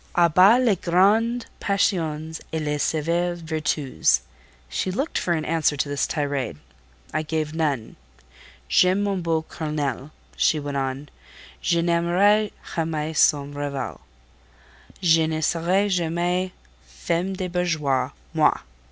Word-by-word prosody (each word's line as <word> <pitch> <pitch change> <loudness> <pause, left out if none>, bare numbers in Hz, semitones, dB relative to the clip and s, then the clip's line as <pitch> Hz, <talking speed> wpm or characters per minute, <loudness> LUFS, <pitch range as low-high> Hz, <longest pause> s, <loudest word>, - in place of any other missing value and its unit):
A 170 -1 +4
bas 195 +9 +6
les 240 -6 +3
grandes 215 +8 +2
passions 160 -6 -1
et 160 - -1
les 150 -1 -2
sévères 170 +3 0
vertus!" 155 - 0 0.5
She 65 - -2
looked 265 - -1
for 175 - 0
an 155 -1 -3
answer 160 -2 +1
to 140 - 0
this 145 0 -1
tirade. 140 - -2 0.6
I 155 - +1
gave 155 -1 -2
none. 145 -8 -2 0.7
"J'aime 185 +2 +3
mon 200 -2 -1
beau 165 -2 0
Colonel," 150 -4 -3 0.3
she - - +2
went 145 -1 -4
on: 135 +1 -3 0.5
"je 170 -1 +1
n'aimerai 180 +5 +3 0.2
jamais 160 -1 -2
son 145 -1 +3
rival. 140 - -4 1.0
Je 165 -2 +4
ne 160 0 -2
serai 175 +5 +1
jamais 180 0 0 0.3
femme 175 +3 -2
de 185 -1 -3
bourgeois, 160 -7 0 0.2
moi!" - - +3
160 Hz, 125 wpm, -24 LUFS, 150-180 Hz, 1.0 s, bas